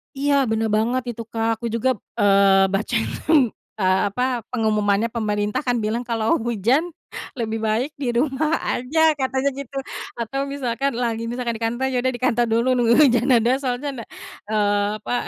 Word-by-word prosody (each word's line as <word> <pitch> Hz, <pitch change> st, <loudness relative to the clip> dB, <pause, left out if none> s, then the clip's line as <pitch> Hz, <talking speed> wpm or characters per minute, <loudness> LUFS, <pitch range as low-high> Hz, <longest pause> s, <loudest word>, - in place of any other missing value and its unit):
Iya 285 Hz, +1 st, +1 dB, 0.2 s
benar 220 Hz, 0 st, 0 dB
banget 235 Hz, +4 st, +1 dB
itu 230 Hz, 0 st, -7 dB
Kak, 225 Hz, -1 st, -1 dB
aku 235 Hz, -, -6 dB
juga, 230 Hz, +3 st, 0 dB, 0.3 s
eee, 195 Hz, -1 st, +5 dB
baca, 215 Hz, +4 st, -1 dB
hmm, 255 Hz, +2 st, +2 dB, 0.3 s
eee, 190 Hz, -2 st, +2 dB
apa 250 Hz, +4 st, -1 dB
pengumumannya 215 Hz, -2 st, +1 dB
pemerintah 210 Hz, -2 st, -1 dB
kan 245 Hz, -1 st, +1 dB
bilang 225 Hz, +3 st, -1 dB
kalau 225 Hz, -2 st, +1 dB
hujan, 235 Hz, -, +1 dB, 0.6 s
lebih 225 Hz, -1 st, -2 dB
baik 225 Hz, +6 st, 0 dB
di 265 Hz, -4 st, -2 dB
rumah 270 Hz, +5 st, 0 dB
aja, 315 Hz, +5 st, +1 dB
katanya 265 Hz, 0 st, 0 dB
gitu. 275 Hz, 0 st, -6 dB, 0.4 s
Atau 270 Hz, +4 st, -2 dB
misalkan 275 Hz, -1 st, -2 dB
lagi 230 Hz, -2 st, -1 dB
misalkan 240 Hz, -1 st, -3 dB
di 225 Hz, -, -6 dB
kantor, 240 Hz, +4 st, 0 dB
ya 255 Hz, -1 st, 0 dB
udah 260 Hz, 0 st, +1 dB
dikantor 240 Hz, -1 st, +1 dB
dulu 230 Hz, +2 st, +2 dB
nunggu 235 Hz, -1 st, +3 dB
hujan 245 Hz, -4 st, +4 dB
reda, 240 Hz, +1 st, +4 dB
soalnya 255 Hz, +2 st, -2 dB
ndak -, -, -20 dB, 0.4 s
eee, 205 Hz, -1 st, +2 dB
apa, -, -, -4 dB
235 Hz, 165 wpm, -22 LUFS, 220-260 Hz, 0.6 s, eee